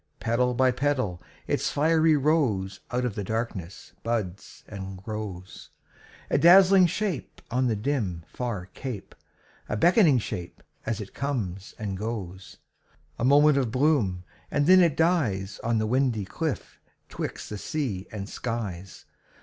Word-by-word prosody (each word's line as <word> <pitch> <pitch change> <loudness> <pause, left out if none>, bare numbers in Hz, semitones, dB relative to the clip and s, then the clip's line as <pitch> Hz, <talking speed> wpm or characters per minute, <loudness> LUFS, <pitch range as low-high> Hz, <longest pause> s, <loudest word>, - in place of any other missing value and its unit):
Petal 125 +2 +1
by 130 +1 +4
petal 125 -9 -1 0.2
its - - 0
fiery 160 +1 +3
rose 125 - +1
Out 125 0 -1
of 120 - -2
the 105 - -4
darkness 100 -4 -4
buds 105 -5 -4
and 95 -2 -7
grows; 95 -2 -7 0.6
A - - +3
dazzling 185 +1 +7
shape 190 -4 -3
on 125 +1 +2
the 115 - +1
dim, 105 - -2
far 115 -7 -4
cape, 125 -7 -6 0.6
A 105 - -1
beckoning 170 - +5
shape 95 -6 -5 0.2
as 110 -1 -1
it 100 - -9
comes 105 -10 -3
and 100 -3 -4
goes. 100 -4 -6 0.6
A - - -2
moment 145 +2 +5
of 130 -4 0
bloom, 125 - +1 0.3
and 145 0 +1
then 185 +3 +7
it 170 -5 +3
dies 125 - +1
On 115 0 +1
the 110 - +1
windy 120 -3 +1
cliff 155 - -4 0.3
'twixt - - -6
the 105 - -4
sea 125 - -3
and 100 -2 -5
skies. 105 -6 -5
115 Hz, 140 wpm, -26 LUFS, 100-145 Hz, 0.6 s, dazzling